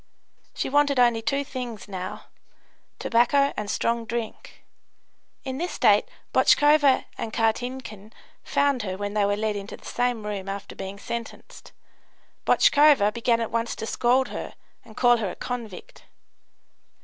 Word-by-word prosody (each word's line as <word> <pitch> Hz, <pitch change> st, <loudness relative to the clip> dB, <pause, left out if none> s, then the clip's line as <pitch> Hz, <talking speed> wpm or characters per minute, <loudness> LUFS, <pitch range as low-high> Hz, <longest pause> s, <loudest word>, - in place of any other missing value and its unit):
She -, -, -2 dB
wanted 285 Hz, -1 st, +2 dB
only 240 Hz, -2 st, +4 dB
two 275 Hz, +5 st, 0 dB
things 250 Hz, -7 st, -7 dB
now 185 Hz, -2 st, -6 dB, 0.7 s
tobacco 275 Hz, +4 st, +2 dB
and 210 Hz, -1 st, -4 dB
strong 230 Hz, +2 st, -1 dB
drink. 235 Hz, -2 st, -6 dB, 0.8 s
In 265 Hz, 0 st, -5 dB
this 350 Hz, +2 st, -3 dB
state -, -, +4 dB, 0.3 s
Botchkova 290 Hz, -2 st, +4 dB
and 225 Hz, -, -4 dB
Kartinkin 225 Hz, -2 st, -2 dB, 0.3 s
found 280 Hz, -3 st, +1 dB
her 190 Hz, -3 st, -4 dB
when 205 Hz, 0 st, -4 dB
they 210 Hz, -1 st, +2 dB
were 205 Hz, 0 st, 0 dB
led 215 Hz, 0 st, -1 dB
into 200 Hz, +2 st, -7 dB
the -, -, -19 dB
same 245 Hz, -3 st, -1 dB
room 200 Hz, -2 st, -4 dB
after 200 Hz, 0 st, -6 dB
being 195 Hz, +1 st, -7 dB
sentenced. 235 Hz, +3 st, -8 dB, 0.8 s
Botchkova 285 Hz, -9 st, +5 dB
began 235 Hz, 0 st, +1 dB
at 230 Hz, -, -3 dB
once 230 Hz, 0 st, -1 dB
to -, -, -5 dB
scold 250 Hz, +3 st, +1 dB
her, -, -, -7 dB, 0.3 s
and 220 Hz, -2 st, -16 dB
call 240 Hz, -1 st, +5 dB
her 210 Hz, -4 st, -2 dB
a -, -, -7 dB
"convict." 245 Hz, -, -7 dB
230 Hz, 145 wpm, -25 LUFS, 210-260 Hz, 0.8 s, Botchkova